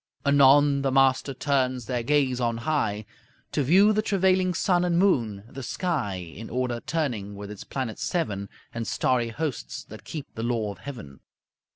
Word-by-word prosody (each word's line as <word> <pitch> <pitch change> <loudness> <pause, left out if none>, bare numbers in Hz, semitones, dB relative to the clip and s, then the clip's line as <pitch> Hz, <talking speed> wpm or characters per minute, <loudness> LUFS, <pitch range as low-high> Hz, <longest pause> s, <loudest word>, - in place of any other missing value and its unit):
Anon 140 0 +5
the 135 -1 0
master 135 +1 +3
turns 130 -2 0
their 125 0 -1
gaze 130 -1 +1
on 115 -1 0
high 110 -9 0 0.5
To - - 0
view 190 +10 +5
the 215 - +2
travailing 185 -3 +2
sun 175 0 +2
and 175 -1 +1
moon, 115 - +2
the 135 +2 -8
sky 135 - -2
In 90 +5 -8
order 125 0 -1
turning 125 -10 -2
with 100 0 -8
its 105 - -8
planets 130 -5 -4
seven, 105 - -2 0.2
And 115 -1 -4
starry 125 -2 +1
hosts 145 +2 -4
that - - -12
keep 155 -4 -6
the 115 - -5
law 115 -3 -1
of 95 - -11
heaven. 100 - -9
130 Hz, 170 wpm, -26 LUFS, 115-150 Hz, 0.5 s, Anon